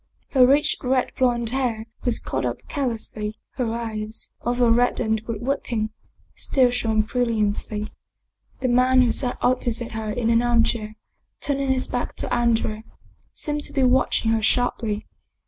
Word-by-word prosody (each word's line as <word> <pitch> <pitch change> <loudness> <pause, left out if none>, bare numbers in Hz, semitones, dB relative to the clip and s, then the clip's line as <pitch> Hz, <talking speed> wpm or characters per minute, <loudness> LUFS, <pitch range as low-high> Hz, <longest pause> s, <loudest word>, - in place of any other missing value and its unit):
Her 255 -3 +6
rich 285 +3 +3
red 255 0 +1
blond 240 -3 +1
hair 245 -4 -1 0.2
was 245 -2 +1
caught - - -3
up - - -4
carelessly, 225 -5 -3 0.2
her 245 -4 0
eyes, 220 -2 -5
although 240 -1 +2
reddened 230 -2 +2
with 230 -1 -4
weeping, 235 -5 -1 0.4
still 255 -3 +2
shone 225 -3 +1
brilliantly. 215 -2 -1 0.7
The 255 - +1
man 255 +1 +4
who 240 - +2
sat 250 -2 0
opposite 240 -2 0
her 220 -1 -4
in 230 0 0
an 230 0 +4
armchair, 230 -2 +1 0.4
turning 275 -1 -1
his 260 -1 +1
back 245 - -3
to - - -3
Andrea, 225 -2 +1 0.5
seemed 295 -1 -2
to - - -2
be 270 - +2
watching 250 -3 +3
her 225 -1 +2
sharply. 220 -2 0
240 Hz, 145 wpm, -23 LUFS, 220-255 Hz, 0.7 s, Her